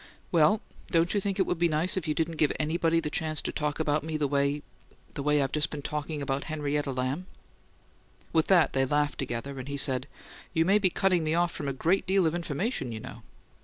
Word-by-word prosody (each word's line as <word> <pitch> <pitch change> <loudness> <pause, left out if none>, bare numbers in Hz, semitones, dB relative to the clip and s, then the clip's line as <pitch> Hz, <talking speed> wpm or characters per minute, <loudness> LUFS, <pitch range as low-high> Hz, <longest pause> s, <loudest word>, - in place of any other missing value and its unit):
"Well, 170 +5 +4 0.3
don't 165 +1 +2
you 205 - +1
think 195 0 -1
it 190 - +3
would 180 - -2
be 170 - +4
nice 160 +3 +1
if 180 -4 -2
you 155 - 0
didn't 165 -1 -1
give 150 - +3
anybody 165 +2 +2
the 150 -2 -3
chance 155 -1 -1
to - - -2
talk 150 0 -2
about 150 -1 +1
me 160 0 -2
the 150 -2 +1
way 140 +1 0 0.5
the - - -4
way 150 +1 +2
I've 135 - -2
just 150 0 0
been 145 -2 -6
talking 150 0 -3
about 135 0 -2
Henrietta 150 -2 -1
Lamb?" 130 +8 -2 1.1
With 160 -1 +3
that 180 -4 +4
they 135 - +2
laughed 145 +2 0
together, 135 +1 -4
and 130 - -7
he 140 0 -3
said, 130 -1 0 0.5
"You 160 0 +3
may 200 +4 +4
be 195 -3 +3
cutting 180 -2 +2
me 155 +1 +1
off 175 0 +2
from 145 - -5
a - - 0
great 170 +10 +1
deal 190 -1 +3
of 160 - +2
information, 170 - -2
you 110 - -5
know." - - -9
155 Hz, 230 wpm, -28 LUFS, 140-170 Hz, 1.1 s, Well